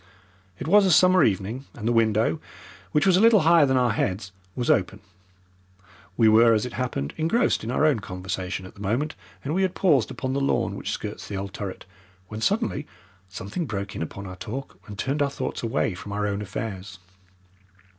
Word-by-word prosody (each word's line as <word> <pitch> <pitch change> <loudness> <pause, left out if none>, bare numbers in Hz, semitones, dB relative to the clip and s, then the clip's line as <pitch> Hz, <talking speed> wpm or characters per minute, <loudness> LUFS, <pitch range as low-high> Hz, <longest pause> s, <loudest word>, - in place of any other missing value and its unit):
It - - -6
was 200 +3 +6
a - - +3
summer 185 +3 +6
evening, 110 +6 -1
and 110 -1 -5
the - - +3
window, 110 -6 +2 0.5
which 150 - +2
was 185 -2 +5
a - - +3
little 220 -2 +6
higher 165 -2 +5
than 130 0 +2
our 125 -2 +3
heads, 100 -1 -2 0.2
was 125 - -2
open. 100 0 +2 1.2
We 115 - +5
were, 115 +1 +6
as 105 - 0
it 125 - -6
happened, 120 - -3
engrossed 165 - +1
in 110 - -4
our 130 +5 +2
own 150 -7 +3
conversation 90 0 -5
at 95 - -11
the 100 - -14
moment 120 +10 -1 0.3
and 145 - -2
we 190 - +1
had 190 -1 0
paused 145 - +3
upon 130 +1 -3
the 140 - 0
lawn 140 - 0
which - - -5
skirts - - -5
the 100 - -4
old 95 0 -5
turret, 100 -3 -6 0.4
when 110 0 -6
suddenly 200 - 0 0.4
something 100 - -5
broke 100 -3 -4
in - - -4
upon 100 +5 -6
our 90 -1 -8
talk 125 +7 -7
and 105 -2 -9
turned 140 +6 -1
our 140 - +2
thoughts 130 -1 -4
away 115 -3 0
from 100 +3 -8
our 105 0 -1
own 100 0 -2
affairs. 100 -2 -6
115 Hz, 200 wpm, -25 LUFS, 100-145 Hz, 1.2 s, was